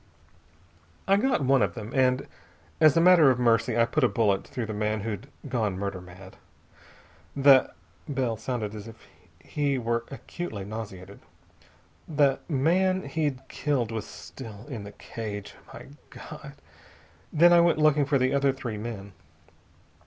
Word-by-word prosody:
"I 195 - +5
got 245 - +1
one 135 +1 +4 0.2
then, 110 +3 -7
and 130 0 +2 0.5
as 155 -1 +5
a - - +6
matter 170 -5 +7
of 130 - +2
mercy 115 -1 +2
I 115 - +5
put 140 +5 -1
a - - +6
bullet 100 -4 +1
through 120 - -4
the 110 - -5
man 105 0 -1
who'd 110 +3 -5 0.2
gone 110 -7 -1
murder 100 -2 -4
mad. 90 +1 -13 1.0
The" 135 -1 +5 0.4
Bell 130 -5 -1
sounded 110 -2 -4
as 105 0 -8
if 115 - -10 0.5
he 140 - -1
were 115 -1 -1
acutely 135 - -7
nauseated 100 -3 -8 0.9
"the 145 -3 +2
man 185 +6 +2
he'd 145 -5 -3
killed 130 -7 -1
was 110 -1 -4
still 110 -4 -10
in 120 -8 -6
the 100 - -10
cage. 105 -3 -7 0.2
My - - -10 0.2
God!... 150 -2 -10 0.8
Then 175 +3 +6
I 170 - +7
went 170 -2 +3
looking 150 -2 +3
for 140 0 +2
the 130 +1 +1
other 140 0 +3
three 125 -5 -6
men. 105 -3 -7
125 Hz, 150 wpm, -27 LUFS, 110-145 Hz, 1.0 s, matter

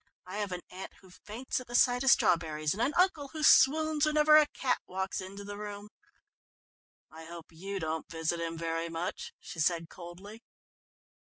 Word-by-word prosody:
"I 185 +2 -7
have 205 -2 -3
an 180 0 -4
aunt 185 +1 -8
who 190 -2 -18
faints 225 +9 -5
at 255 - -11
the 240 - -5
sight 245 +1 +4
of 270 - +3
strawberries, 155 -7 +2
and 210 - -4
an 285 +4 0
uncle 355 -6 +2
who 310 -1 -4
swoons 310 +1 +5
whenever 305 0 +5
a 305 -1 +7
cat 265 -3 -1
walks 190 +1 -3
into 195 +2 -8
the 205 0 -8
room." 205 0 -7 1.2
"I 160 +1 -11
hope 170 0 -11
you 195 +4 -6
don't 160 -1 -4
visit 165 +1 -2
him 165 0 -4
very 165 0 -3
much," 165 +2 -5
she 180 -4 -10
said 165 0 0
coldly. 185 +5 -11
190 Hz, 180 wpm, -30 LUFS, 165-245 Hz, 1.2 s, a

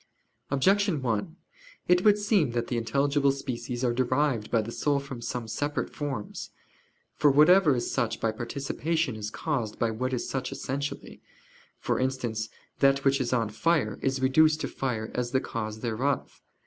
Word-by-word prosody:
Objection 190 +5 +2
1: 115 +7 -1 0.5
It 180 0 +4
would 210 -1 +6
seem 205 - +2
that 120 -1 -2
the 125 - -1
intelligible 140 +5 +2
species 125 -2 -4
are 120 -2 +2
derived 130 -2 +1
by 115 - +2
the 110 +2 -3
soul 145 +3 +1
from 135 -3 -8
some 120 0 -4
separate 145 +7 -2
forms. 135 -8 -5 0.6
For 150 - +4
whatever 155 +2 +6
is 120 - -2
such 115 - -1
by 115 - +1
participation 140 +5 -2
is 105 -1 -4
caused 120 -5 -3
by 115 -1 +1
what 130 +4 -2
is 125 - -2
such 130 -1 -3
essentially; 140 +2 -5 0.6
for - - -1
instance, 120 -4 -2 0.3
that 135 0 +3
which 135 0 +3
is 120 - -1
on 115 -4 +1
fire 165 +8 +1
is 135 0 0
reduced 155 +4 +4
to - - -1
fire 115 -5 -3
as 125 -1 -2
the 130 - +4
cause 110 -3 -5
thereof. 125 +4 -2
130 Hz, 165 wpm, -28 LUFS, 115-145 Hz, 0.6 s, would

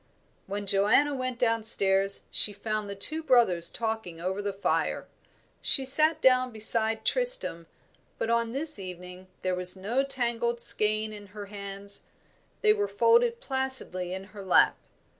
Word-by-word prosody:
When 200 +1 -5
Joanna 205 +9 +2
went 255 -2 -4
downstairs, 210 -5 +3
she 210 - +4
found 215 0 -5
the 200 - -6
two 310 +11 +1
brothers 230 - +3
talking 220 -7 -5
over 190 +3 -4
the 205 0 -3
fire. 195 +1 -2 0.6
She 270 - +4
sat 310 +4 +4
down 255 -1 +3
beside 220 0 +1
Tristram, - - +1 0.5
but - - -3
on 235 -1 -1
this 290 -1 -1
evening 180 0 -9 0.2
there 185 0 -1
was 180 0 +1
no 220 +8 -2
tangled 240 -3 -3
skein 215 -1 +2
in 205 -1 -12
her 205 - -7
hands; 200 0 -7 0.6
they 425 -1 +4
were 410 -1 -2
folded 470 +1 +1
placidly 265 - -4
in 190 +1 -6
her 200 -2 -10
lap. 185 - +3
220 Hz, 145 wpm, -26 LUFS, 195-260 Hz, 0.6 s, she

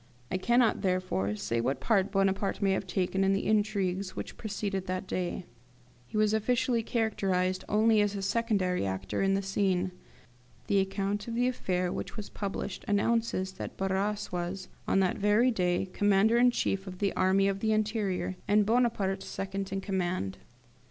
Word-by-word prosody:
I 185 - +1
cannot, 240 +2 +3
therefore, 180 - 0
say 105 +3 -1
what 130 +3 -1
part 200 - +2
Bonaparte 195 0 +1
may 195 -1 +2
have 190 0 -1
taken 185 +1 0
in 195 0 +3
the 195 - -1
intrigues 200 -3 0
which - - -6
preceded 200 -3 -3
that 185 +1 -2
day. 180 -1 -3 0.6
He 215 - -5
was 215 0 +3
officially 240 +2 +1
characterised 190 -5 0
only 215 +1 +4
as 205 -1 +1
secondary 195 - +1
actor 95 0 -2
in 195 0 +3
the 195 - -1
scene. 190 -1 0 0.7
The 200 - +2
account 195 +2 -1
of 230 - -4
the 245 +1 +2
affair 185 -7 -1
which - - -5
was 210 - -6
published 200 -1 -4
announces 205 -2 +1
that 190 - -7
Barras 195 +2 -1
was, 180 +1 -4 0.2
on 195 - +3
that 185 - 0
very 210 +5 +4
day, 180 -3 0
Commander 205 +3 +3
in 245 0 +6
chief 195 -5 -1
of 185 -1 -7
the 200 +1 0
Army 190 +1 +3
of 195 0 -1
the 220 +1 +1
Interior, 210 -4 -1
and 210 0 +4
Bonaparte 215 -4 +1
second 195 0 -4
in 195 0 -2
command. 185 - -2
195 Hz, 165 wpm, -29 LUFS, 185-215 Hz, 0.7 s, in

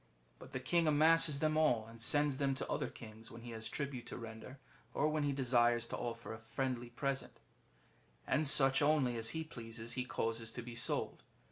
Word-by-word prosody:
But - - -12
the - - -3
king 170 -2 +1
amasses 155 0 +5
them 155 0 +2
all, 125 -8 +3
and 115 0 -12
sends 145 +3 +3
them 135 -1 +1
to - - -4
other - - -1
kings 110 0 -11
when 115 0 -11
he 120 - -7
has 110 -1 -6
tribute 140 -4 -4
to - - -6
render, 115 +3 -9 0.4
or 150 - +2
when 155 0 0
he 145 -1 +1
desires 120 -3 +2
to - - -3
offer 115 -1 -5
a 110 - -8
friendly 120 +1 -3
present; 135 +3 -3 0.9
and 155 0 +2
such 135 -1 +6
only 145 -5 +3
as 110 -1 -1
he 160 - -2
pleases 115 -5 -6
he 125 - -1
causes 115 -2 -2
to 120 - -6
be 120 0 -8
sold. 115 0 -1
125 Hz, 200 wpm, -36 LUFS, 115-145 Hz, 0.9 s, such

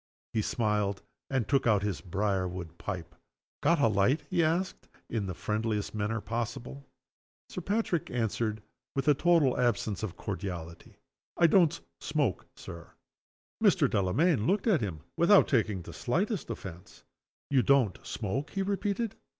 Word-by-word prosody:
_" - - - 0.3
He 110 - +2
smiled, 105 -3 0 0.3
and 130 -6 0
took 135 0 +2
out 105 -3 +4
his 105 -3 -2
brier 95 0 0
wood 90 -2 -7
pipe. 90 -5 -5 0.5
"Got 170 -1 +3
a 140 - +5
light?" 110 +8 +2
he 175 -2 +3
asked, 170 +4 -1 0.2
in 110 -4 -1
the 90 - -4
friendliest 110 0 -2 0.3
possible 120 +2 -3
manner. 140 0 -12 0.6
Sir 180 - -5
Patrick 200 -3 0
answered, 110 -2 -1 0.3
with 135 0 -1
a 150 - +7
total 160 -3 +3
absence 115 -4 +1
of 95 -6 -4
cordiality: 90 -5 -6 0.4
"I 170 - +5
don't 170 -1 +4 0.2
smoke, 145 - -1
Sir." 85 -1 -10 0.7
Mr. - - +5
Delamayn 115 - +2
looked 200 +1 +2
at 200 - +3
him, 90 -8 -3 0.2
without 190 +4 +6
taking 105 -7 +1
the - - -9
slightest 190 - -1
offense: 90 -6 -8 0.5
"You 135 -2 +5
don't 130 -7 +3
smoke!" 120 +7 -3
he 195 - -2
repeated. 200 +2 -1
115 Hz, 150 wpm, -30 LUFS, 100-155 Hz, 0.7 s, a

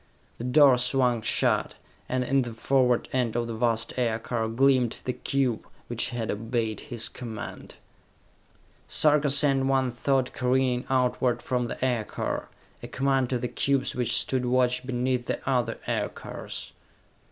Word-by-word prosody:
The - - -5
door 130 -1 +6
swung 125 -2 +1
shut, - - +1 0.3
and 130 0 0
in 135 +2 +2
the 120 -3 -5
forward 125 0 +2
end 125 -4 0
of 120 -1 0
the 115 - -5
vast 115 0 0
aircar 115 -1 -1
gleamed 125 0 +2
the 125 - -1
cube 130 -5 -1 0.2
which 120 +1 -1
had 120 -3 -3
obeyed 110 0 -2
his 120 -5 -2
command! 115 -3 -8 1.1
Sarka 150 -1 +4
sent 135 -1 +4
one 135 -2 +2
thought 130 +1 0
careening 125 0 +1
outward 125 -2 +1
from 125 -1 -1
the 125 - -3
aircar, 120 -4 -2 0.3
a - - -7
command 135 -1 0
to 125 - 0
the 125 - -3
cubes 140 +2 0
which 120 -2 +1
stood 130 -1 -1
watch 125 0 +1
beneath 125 -1 -1
the - - -2
other 125 -3 0
aircars. - - -4
125 Hz, 145 wpm, -26 LUFS, 120-130 Hz, 1.1 s, door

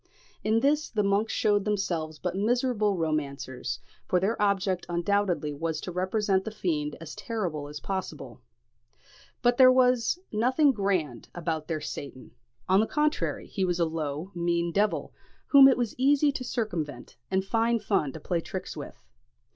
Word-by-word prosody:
In 220 +1 +2
this 295 +3 +2
the 210 -2 0
monks 200 +3 +1
shewed 205 -1 +2
themselves 170 -7 -2
but 180 +3 -3
miserable 215 -1 +1
romancers; 140 -5 -3 0.3
for 180 - +2
their 205 +4 -1
object 195 -3 +1
undoubtedly 175 -3 0
was 160 +1 -3
to 180 - -5
represent 190 +2 0
the 220 - -4
fiend 155 -8 -2
as 160 -2 -8
terrible 175 -11 -3
as 150 0 -7
possible. 190 +2 -5 1.0
But 245 0 +3
there 255 -1 +8
was 255 +2 +3
nothing 255 +7 +3
grand 185 - -1
about 165 -3 -3
their 160 -2 -2
Satan; 135 -3 -7 0.4
on 190 +1 +4
the 220 - +2
contrary, 300 +3 0
he 195 - -3
was 180 -1 0
a 170 - +3
low, 160 +2 -4
mean 170 0 0
devil, 205 +3 0 0.4
whom 275 -1 +9
it 265 - +4
was 240 -3 -1
easy 285 +2 +4
to 265 - -5
circumvent, 175 - -4
and 190 0 0
fine 230 +3 +2
fun 195 -9 0
to - - -7
play 170 +2 -1
tricks - - -6
with. - - -9
190 Hz, 160 wpm, -27 LUFS, 165-225 Hz, 1.0 s, whom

